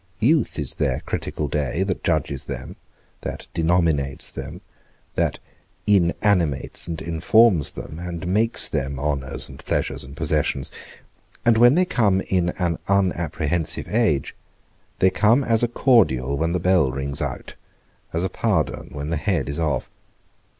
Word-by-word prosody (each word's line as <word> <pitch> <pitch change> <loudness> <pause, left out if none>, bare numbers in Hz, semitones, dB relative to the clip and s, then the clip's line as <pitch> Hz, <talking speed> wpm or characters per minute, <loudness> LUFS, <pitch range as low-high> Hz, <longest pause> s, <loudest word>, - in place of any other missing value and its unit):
Youth 145 +7 +2
is 75 -4 -3
their - - -1
critical 75 - -3
day, 75 +5 -1
that 95 -2 -3
judges 75 -5 -1
them, - - -6 0.5
that - - -5
denominates 80 -5 +1
them, - - -7 0.5
that - - 0 0.5
inanimates 90 -6 +2
and 80 -2 -4
informs 85 +1 +3
them, 80 - -8
and 90 0 -5
makes 110 +6 +2
them 70 0 -2
honours, 70 -2 -2
and 65 - -12
pleasures, 70 +1 -1
and 70 +1 -11
possessions; 75 -4 0 0.7
and 120 -1 +5
when 120 +4 +6
they 185 +1 +4
come 105 - +2
in 90 -3 0
an 85 -3 -1
unapprehensive 85 -4 0
age, 105 - +1 0.6
they 95 - +4
come 110 +8 +3
as 115 -3 +2
a 120 - +3
cordial 95 - +3
when 80 +3 0
the 90 - +1
bell 90 -5 +3
rings 70 +2 -2
out, 65 -4 -4 0.6
as 85 +2 -1
a - - +1
pardon - - -1
when 75 +2 -4
the 85 - 0
head 75 - 0
is 70 +2 -3
off. 75 -4 -1
85 Hz, 145 wpm, -23 LUFS, 70-100 Hz, 0.7 s, when